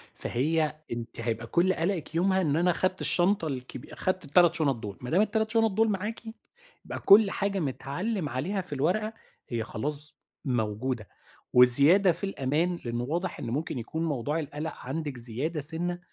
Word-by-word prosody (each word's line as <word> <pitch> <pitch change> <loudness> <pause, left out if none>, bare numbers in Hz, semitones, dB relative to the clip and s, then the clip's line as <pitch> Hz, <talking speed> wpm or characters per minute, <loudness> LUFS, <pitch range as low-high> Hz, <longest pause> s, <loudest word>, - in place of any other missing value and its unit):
فهي 155 +4 0 0.2
أنتِ 120 0 -6
هيبقى 115 0 -3
كُلّ 180 +8 +2
قلَقِك 170 -2 -2
يومها 190 +2 +2
إن 150 -5 +1
أنا 175 +2 +3
خدت 185 +2 -1
الشنطة 175 -1 +4
الكبي 130 -3 -7
خدت 185 -2 -1
ال3 170 +3 +4
شُنط 150 -5 +2
دول، 105 -4 -7
ما 125 - -6
دام 180 +6 +3
ال3 220 +1 0
شُنط 225 -2 +3
دول 220 +3 +2
معاكِ 210 +3 -3 0.6
يبقى - - -5
كُلّ 200 0 +6
حاجة 200 0 -1
متْعلِّم 155 - -3
عليها 170 +11 -2
في 180 -5 -8
الورقة 185 +11 0 0.4
هي 115 -2 -2
خلاص 145 +7 -5 0.3
موجودة، 115 -2 -2 0.5
وزيادة 140 +10 +6
في 170 - -6
الأمان 170 +1 -1
لأنه 120 0 -2
واضح 170 +7 -3
إن - - -5
مُمكن 135 +1 -2
يكون 160 +8 -3
موضوع 150 +1 -1
القَلَق 150 +1 -5
عندِك 140 0 -5
زيادة 130 +7 -3
سِنَّة، 175 +4 +1
160 Hz, 165 wpm, -28 LUFS, 130-185 Hz, 0.6 s, كُلّ